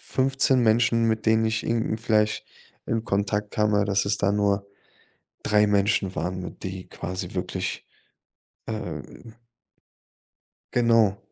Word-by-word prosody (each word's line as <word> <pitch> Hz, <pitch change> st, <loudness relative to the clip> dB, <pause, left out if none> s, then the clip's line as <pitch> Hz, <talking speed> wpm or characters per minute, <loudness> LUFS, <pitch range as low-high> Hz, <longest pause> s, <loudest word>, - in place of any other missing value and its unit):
15 135 Hz, 0 st, +2 dB
Menschen, 115 Hz, 0 st, +3 dB
mit 110 Hz, 0 st, 0 dB
denen 110 Hz, 0 st, +4 dB
ich 110 Hz, 0 st, 0 dB
irgendwie 115 Hz, -1 st, 0 dB
vielleicht 105 Hz, -2 st, +1 dB, 0.4 s
in 115 Hz, -1 st, -1 dB
Kontakt 105 Hz, 0 st, -1 dB
kam, 105 Hz, 0 st, +1 dB
aber 105 Hz, 0 st, +3 dB
dass 100 Hz, 0 st, +1 dB
es 100 Hz, +1 st, 0 dB
da 100 Hz, 0 st, +2 dB
nur 100 Hz, -1 st, +1 dB, 0.8 s
3 105 Hz, 0 st, +3 dB
Menschen 100 Hz, -2 st, +1 dB
waren, 90 Hz, +1 st, -4 dB
die 95 Hz, -1 st, -6 dB
quasi 90 Hz, 0 st, -6 dB
wirklich, 95 Hz, 0 st, -3 dB, 0.8 s
ähm 115 Hz, -, -7 dB, 1.4 s
Genau. 115 Hz, -4 st, +3 dB
105 Hz, 120 wpm, -25 LUFS, 100-115 Hz, 1.4 s, denen